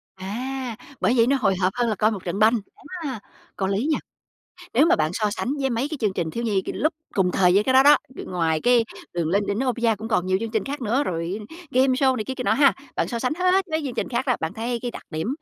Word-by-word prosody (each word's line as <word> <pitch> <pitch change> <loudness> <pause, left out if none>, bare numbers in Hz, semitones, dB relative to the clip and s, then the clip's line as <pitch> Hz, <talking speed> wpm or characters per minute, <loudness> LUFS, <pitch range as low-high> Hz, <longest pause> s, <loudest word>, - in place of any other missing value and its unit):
À, 245 +6 -4 0.3
bởi 235 - +3
vậy 230 0 +5
nó 275 +1 +3
hồi 195 -6 +2
hộp 185 +1 +2
hơn 240 -1 +1
là 215 - 0
coi 215 +3 +2
một 195 -4 -5
trận 180 +3 -2
banh, 225 +2 +5 0.4
á, 265 -7 -4 0.4
có 190 - -1
lý 200 +6 0
nha. - - +2 0.8
Nếu 310 - +5
mà - - +4
bạn 155 0 +1
so 210 0 0
sánh 245 +6 -2
với 270 -1 0
mấy 240 +4 -1
cái 310 - -4
chương 210 -4 +1
trình 170 -4 -2
thiếu 235 +7 -4
nhi 205 -4 +1
c - - -22
lúc 310 +2 +1 0.2
cùng 185 -2 +2
thời 180 -2 +4
với 200 - +5
cái 260 - +2
đó 260 +1 +7
đó, 290 +1 +8 0.3
ngoài 165 -3 0
cái 245 +2 +4 0.3
"Đường 170 -2 -1
lên 200 +4 +1
đỉnh 200 - -1
Olympia" 240 -3 +1
cũng 220 +1 -6
còn 185 -5 +1
nhiều 185 0 +2
chương 230 0 -3
trình 220 -3 -1
khác 285 +1 -5
nữa 245 +4 +1
rồi 175 - -3 0.3
game 260 +2 +3
show 260 0 +2
này 215 - -3
kia 260 - -4
kia 255 -1 -5
nọ 200 - +3
ha. 275 +4 +5 0.2
Bạn - - 0
so 235 - -3
sánh 250 +3 0
hết 370 +2 +2
mấy 315 -1 -1
chương 260 -4 -4
trình - - -2
khác 255 +2 -2
đó, 250 - +2
bạn 160 - -2
thấy 235 +2 -2
cái 245 - -2
đặc - - -9
điểm, 160 +4 -3
230 Hz, 275 wpm, -24 LUFS, 195-260 Hz, 0.8 s, đó